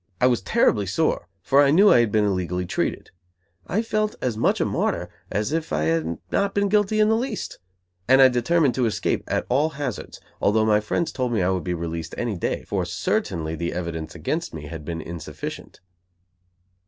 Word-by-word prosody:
I -, -, +4 dB
was 125 Hz, -1 st, +3 dB
terribly 105 Hz, -, +2 dB
sore, 155 Hz, -, 0 dB, 0.2 s
for 140 Hz, +8 st, +4 dB
I 140 Hz, -, +5 dB
knew 195 Hz, +8 st, +6 dB
I -, -, +6 dB
had 115 Hz, -3 st, +2 dB
been 105 Hz, 0 st, +3 dB
illegally 90 Hz, -2 st, -1 dB
treated. -, -, -2 dB, 0.6 s
I 215 Hz, +5 st, 0 dB
felt 215 Hz, -1 st, -1 dB
as 125 Hz, -3 st, -1 dB
much 110 Hz, -, +1 dB
a -, -, +2 dB
martyr -, -, -1 dB, 0.2 s
as 105 Hz, +7 st, -1 dB
if 165 Hz, 0 st, -2 dB
I 75 Hz, -, 0 dB
had 80 Hz, +1 st, 0 dB
not 200 Hz, 0 st, 0 dB
been 200 Hz, 0 st, +2 dB
guilty 210 Hz, +1 st, +2 dB
in 215 Hz, -, +5 dB
the 220 Hz, -, +3 dB
least; 235 Hz, -1 st, -4 dB, 0.5 s
and 130 Hz, +2 st, +6 dB
I 135 Hz, -, +9 dB
determined 130 Hz, +3 st, +2 dB
to 125 Hz, -1 st, +1 dB
escape 110 Hz, -, -1 dB
at -, -, -1 dB
all 145 Hz, +5 st, +2 dB
hazards; 135 Hz, -6 st, -5 dB, 0.2 s
although 110 Hz, +2 st, +3 dB
my 105 Hz, -1 st, +4 dB
friends 105 Hz, +10 st, -1 dB
told 125 Hz, -2 st, -2 dB
me 105 Hz, -5 st, +1 dB
I 90 Hz, -, +2 dB
would 95 Hz, -2 st, -1 dB
be 90 Hz, -1 st, -2 dB
released 80 Hz, -1 st, -5 dB
any 120 Hz, -4 st, -2 dB
day; 85 Hz, -, -2 dB
for -, -, -2 dB
certainly 80 Hz, -1 st, -2 dB
the 85 Hz, +1 st, -3 dB
evidence 85 Hz, -2 st, -5 dB
against -, -, -3 dB
me 75 Hz, -, -7 dB
had 80 Hz, +1 st, -7 dB
been 80 Hz, +1 st, -4 dB
insufficient. 80 Hz, 0 st, -8 dB
110 Hz, 200 wpm, -24 LUFS, -, 0.6 s, I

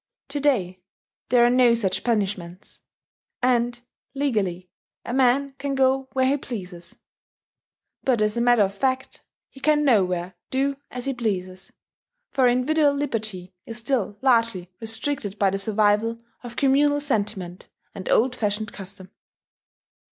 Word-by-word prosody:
To 290 Hz, +1 st, -3 dB
day, 200 Hz, -11 st, +1 dB, 0.5 s
there 240 Hz, -1 st, +5 dB
are -, -, +5 dB
no 245 Hz, -2 st, +5 dB
such 195 Hz, -5 st, -1 dB
punishments; 195 Hz, -5 st, -3 dB, 0.6 s
and, 240 Hz, -1 st, +2 dB, 0.4 s
legally, 205 Hz, -10 st, -1 dB, 0.4 s
a 240 Hz, -, -4 dB
man 270 Hz, +2 st, +2 dB
can 280 Hz, -1 st, -2 dB
go 265 Hz, 0 st, +2 dB
where 260 Hz, -1 st, +2 dB
he 275 Hz, +2 st, +2 dB
pleases. 180 Hz, -10 st, -8 dB, 1.1 s
But 255 Hz, -4 st, +2 dB
as 210 Hz, 0 st, +1 dB
a 235 Hz, -, 0 dB
matter 240 Hz, -3 st, +5 dB
of 195 Hz, 0 st, -1 dB
fact 260 Hz, +4 st, -2 dB, 0.2 s
he 270 Hz, -, -16 dB
can 300 Hz, +1 st, +2 dB
nowhere 185 Hz, -7 st, +2 dB, 0.2 s
do 275 Hz, +1 st, 0 dB
as 250 Hz, -1 st, -6 dB
he 275 Hz, -, -1 dB
pleases; 190 Hz, -6 st, -4 dB, 0.6 s
for 265 Hz, -2 st, +3 dB
individual 285 Hz, +4 st, +3 dB
liberty 215 Hz, -10 st, -3 dB
is 230 Hz, -, -6 dB
still 230 Hz, -4 st, -1 dB
largely 230 Hz, -8 st, +2 dB
restricted 225 Hz, -2 st, -3 dB
by 200 Hz, -2 st, +2 dB
the 195 Hz, -, -1 dB
survival 215 Hz, +2 st, +2 dB, 0.2 s
of 240 Hz, -1 st, -9 dB
communal 290 Hz, +2 st, +3 dB
sentiment 205 Hz, -10 st, -3 dB, 0.2 s
and 190 Hz, -3 st, -7 dB
old 250 Hz, +2 st, +3 dB
fashioned 210 Hz, -2 st, -2 dB
custom. 190 Hz, -1 st, -10 dB
235 Hz, 135 wpm, -24 LUFS, 200-265 Hz, 1.1 s, there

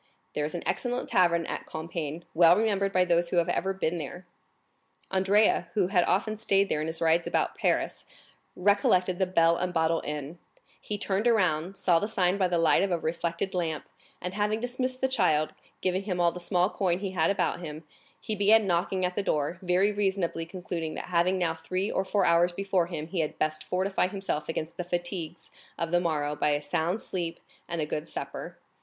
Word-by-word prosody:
There 150 Hz, -, -1 dB
is 155 Hz, -, -4 dB
an 175 Hz, -, -4 dB
excellent 245 Hz, 0 st, -2 dB
tavern 170 Hz, -2 st, +3 dB
at -, -, -5 dB
Compiègne, 160 Hz, 0 st, -5 dB
well 170 Hz, +1 st, +7 dB
remembered 200 Hz, -3 st, +1 dB
by 185 Hz, -1 st, +3 dB
those 170 Hz, 0 st, +2 dB
who 175 Hz, -, -1 dB
have 170 Hz, -, +2 dB
ever 190 Hz, -, 0 dB
been 175 Hz, -3 st, -1 dB
there. 175 Hz, +5 st, -7 dB, 0.9 s
Andrea, 195 Hz, +3 st, +3 dB
who 190 Hz, -4 st, +2 dB
had 180 Hz, -3 st, +3 dB
often 215 Hz, +3 st, 0 dB
stayed 200 Hz, -2 st, +2 dB
there 150 Hz, -, 0 dB
in 155 Hz, -, -2 dB
his 160 Hz, 0 st, -5 dB
rides 165 Hz, +1 st, +3 dB
about -, -, 0 dB
Paris, -, -, 0 dB, 0.5 s
recollected 185 Hz, -2 st, +2 dB
the 190 Hz, -, +2 dB
Bell 170 Hz, -2 st, +3 dB
and 180 Hz, 0 st, -1 dB
Bottle 165 Hz, -1 st, +1 dB
inn; 150 Hz, +3 st, -5 dB, 0.4 s
he 210 Hz, -, -4 dB
turned 200 Hz, +2 st, 0 dB
around, 185 Hz, -5 st, +1 dB
saw 180 Hz, -4 st, +3 dB
the 205 Hz, -, -2 dB
sign 190 Hz, -3 st, +1 dB
by 185 Hz, -, +3 dB
the 175 Hz, -1 st, 0 dB
light 165 Hz, -1 st, +4 dB
of 195 Hz, -, +1 dB
a 175 Hz, -, +1 dB
reflected 170 Hz, +3 st, -2 dB
lamp, 165 Hz, -4 st, -2 dB, 0.3 s
and 180 Hz, +1 st, -5 dB
having 210 Hz, +2 st, 0 dB
dismissed 255 Hz, +2 st, -3 dB
the 265 Hz, -, +3 dB
child, 180 Hz, -12 st, +2 dB, 0.3 s
giving 185 Hz, 0 st, 0 dB
him 190 Hz, -3 st, -3 dB
all 170 Hz, -1 st, +4 dB
the 180 Hz, -, -8 dB
small 180 Hz, 0 st, +2 dB
coin 180 Hz, -3 st, 0 dB
he 195 Hz, 0 st, -4 dB
had 165 Hz, -3 st, +2 dB
about 200 Hz, -2 st, 0 dB
him, 155 Hz, -2 st, -7 dB, 0.4 s
he 220 Hz, -, -3 dB
began 210 Hz, +2 st, +5 dB
knocking 185 Hz, +1 st, 0 dB
at 180 Hz, 0 st, -2 dB
the -, -, +1 dB
door, 155 Hz, -1 st, -1 dB
very 185 Hz, +3 st, +2 dB
reasonably 190 Hz, -5 st, -1 dB
concluding 175 Hz, -3 st, -5 dB
that -, -, -6 dB
having 175 Hz, +2 st, +3 dB
now 170 Hz, -3 st, +1 dB
three 185 Hz, +4 st, -3 dB
or 190 Hz, -, 0 dB
four 200 Hz, +1 st, +1 dB
hours 170 Hz, +1 st, +4 dB
before 190 Hz, -1 st, 0 dB
him 160 Hz, -3 st, -5 dB
he 170 Hz, +2 st, -4 dB
had 155 Hz, -2 st, -2 dB
best 155 Hz, 0 st, -1 dB
fortify 185 Hz, +1 st, 0 dB
himself 190 Hz, -6 st, -3 dB
against 160 Hz, 0 st, -4 dB
the 180 Hz, -, -2 dB
fatigues 175 Hz, -1 st, -4 dB, 0.3 s
of 165 Hz, 0 st, -2 dB
the 175 Hz, -, +4 dB
morrow 150 Hz, -3 st, -1 dB
by 150 Hz, -, +1 dB
a 145 Hz, 0 st, +2 dB
sound 160 Hz, +6 st, -1 dB
sleep 170 Hz, -5 st, -4 dB, 0.3 s
and 170 Hz, -1 st, -2 dB
a -, -, 0 dB
good 150 Hz, +1 st, -4 dB
supper. -, -, -6 dB
180 Hz, 205 wpm, -28 LUFS, 165-195 Hz, 0.9 s, well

